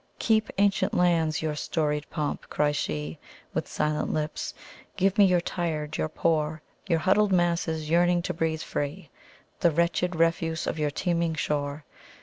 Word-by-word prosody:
"Keep, 220 Hz, -1 st, +2 dB
ancient 200 Hz, 0 st, +2 dB
lands, 165 Hz, -3 st, +2 dB
your 155 Hz, -1 st, 0 dB
storied 150 Hz, -1 st, -1 dB
pomp!" 150 Hz, -1 st, -3 dB
cries 145 Hz, 0 st, +1 dB
sheWith 75 Hz, -, -5 dB
silent 150 Hz, 0 st, -1 dB
lips. 155 Hz, 0 st, -3 dB, 0.4 s
"Give 195 Hz, 0 st, +2 dB
me 200 Hz, -, +8 dB
your 180 Hz, -2 st, +3 dB
tired, 155 Hz, -4 st, -3 dB
your 155 Hz, -, -1 dB
poor, 155 Hz, -1 st, 0 dB, 0.2 s
Your 170 Hz, -3 st, +3 dB
huddled 195 Hz, +4 st, +3 dB
masses 170 Hz, -3 st, +1 dB
yearning 175 Hz, +2 st, +3 dB
to -, -, -2 dB
breathe 160 Hz, -1 st, -1 dB
free, 145 Hz, +2 st, -4 dB, 0.5 s
The 170 Hz, -, +4 dB
wretched 170 Hz, +2 st, +1 dB
refuse 165 Hz, 0 st, +1 dB
of -, -, -2 dB
your 150 Hz, -1 st, +1 dB
teeming 170 Hz, +1 st, 0 dB
shore. 145 Hz, 0 st, -2 dB
160 Hz, 145 wpm, -27 LUFS, 150-175 Hz, 0.5 s, me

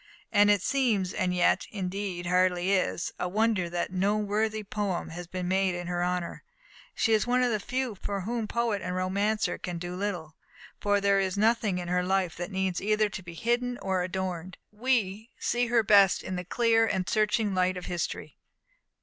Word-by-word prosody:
And 205 Hz, -1 st, +5 dB
it 205 Hz, -3 st, +3 dB
seems 220 Hz, -9 st, +1 dB
and 185 Hz, -2 st, 0 dB
yet, 180 Hz, 0 st, +2 dB
indeed, 190 Hz, -2 st, -4 dB
hardly 180 Hz, +1 st, +2 dB
is 185 Hz, -2 st, 0 dB
a 180 Hz, -, -1 dB
wonder 210 Hz, -3 st, +1 dB
that 175 Hz, +1 st, -3 dB
no 200 Hz, +3 st, +1 dB
worthy 215 Hz, +1 st, -1 dB
poem 200 Hz, -3 st, -3 dB
has 175 Hz, +1 st, -7 dB
been 180 Hz, 0 st, -4 dB
made 190 Hz, 0 st, +1 dB
in 175 Hz, 0 st, -5 dB
her 175 Hz, 0 st, -1 dB
honour. 180 Hz, -1 st, -2 dB, 0.5 s
She 225 Hz, -, +2 dB
is 215 Hz, +2 st, +2 dB
one 250 Hz, +1 st, +3 dB
of 245 Hz, -, +2 dB
the 215 Hz, -, 0 dB
few 250 Hz, +3 st, -2 dB
for 200 Hz, 0 st, -4 dB
whom 225 Hz, +3 st, -2 dB
poet 230 Hz, -3 st, 0 dB
and 180 Hz, +1 st, -3 dB
romancer 200 Hz, +4 st, 0 dB
can 175 Hz, -2 st, -4 dB
do 175 Hz, +1 st, -5 dB
little; 180 Hz, -5 st, -4 dB, 0.4 s
for 205 Hz, 0 st, +1 dB
as 200 Hz, -, +2 dB
there 200 Hz, 0 st, +4 dB
is 190 Hz, 0 st, -1 dB
nothing 215 Hz, -2 st, +2 dB
in 175 Hz, -1 st, -4 dB
her 180 Hz, +1 st, +1 dB
life 185 Hz, -2 st, 0 dB
that 175 Hz, +1 st, -4 dB
needs 190 Hz, -2 st, -1 dB
either 215 Hz, +1 st, +2 dB
to 200 Hz, -, -6 dB
be 170 Hz, -2 st, -10 dB
hidden 240 Hz, +4 st, 0 dB
or 190 Hz, -4 st, -1 dB
adorned, 185 Hz, -1 st, -4 dB
we 220 Hz, -2 st, -1 dB
see 240 Hz, 0 st, 0 dB
her 230 Hz, -1 st, +3 dB
best 200 Hz, -2 st, +5 dB
in 185 Hz, -, -4 dB
the 180 Hz, -, -3 dB
clear 225 Hz, +2 st, +3 dB
and 185 Hz, -3 st, -1 dB
searching 215 Hz, -1 st, +1 dB
light 185 Hz, 0 st, +1 dB
of 180 Hz, -, -6 dB
history. 175 Hz, -1 st, -4 dB
195 Hz, 195 wpm, -28 LUFS, 180-215 Hz, 0.5 s, And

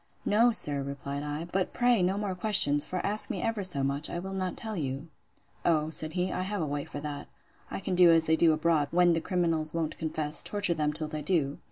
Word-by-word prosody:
No, 230 Hz, +4 st, +4 dB
sir, 145 Hz, -10 st, +2 dB
replied 140 Hz, +1 st, -6 dB
I: 150 Hz, +2 st, -5 dB
But 185 Hz, +2 st, -3 dB
pray 245 Hz, -4 st, +2 dB
no 185 Hz, +2 st, 0 dB
more 205 Hz, -2 st, -3 dB
questions: 180 Hz, -7 st, +4 dB
for 185 Hz, -, -4 dB
ask 210 Hz, +2 st, +4 dB
me -, -, -3 dB
ever 225 Hz, -2 st, -2 dB
so 175 Hz, -8 st, 0 dB
much, 140 Hz, +2 st, 0 dB
I -, -, -5 dB
will 190 Hz, +2 st, -6 dB
not 185 Hz, -1 st, -4 dB
tell 220 Hz, -2 st, -5 dB
you. 140 Hz, -1 st, -5 dB, 0.5 s
O, 155 Hz, -2 st, +1 dB
said 155 Hz, 0 st, 0 dB
he, 180 Hz, +1 st, -1 dB
I -, -, -3 dB
have 200 Hz, +2 st, -3 dB
a -, -, -1 dB
way 145 Hz, -1 st, -4 dB
for 145 Hz, -, -8 dB
that. 145 Hz, -1 st, -6 dB, 0.4 s
I -, -, -5 dB
can 195 Hz, -1 st, -4 dB
do 180 Hz, -1 st, +6 dB
as 165 Hz, -1 st, +4 dB
they 160 Hz, -, +3 dB
do 165 Hz, 0 st, +3 dB
abroad, 155 Hz, -1 st, +1 dB
when 175 Hz, +1 st, +3 dB
the 165 Hz, -, -1 dB
criminals 165 Hz, -4 st, -1 dB
won't 160 Hz, -2 st, -3 dB
confess; 155 Hz, -1 st, 0 dB
torture 205 Hz, -4 st, 0 dB
them 150 Hz, -2 st, -1 dB
till 155 Hz, +1 st, +2 dB
they 155 Hz, 0 st, -6 dB
do. 150 Hz, -3 st, -1 dB
165 Hz, 235 wpm, -28 LUFS, 150-185 Hz, 0.5 s, do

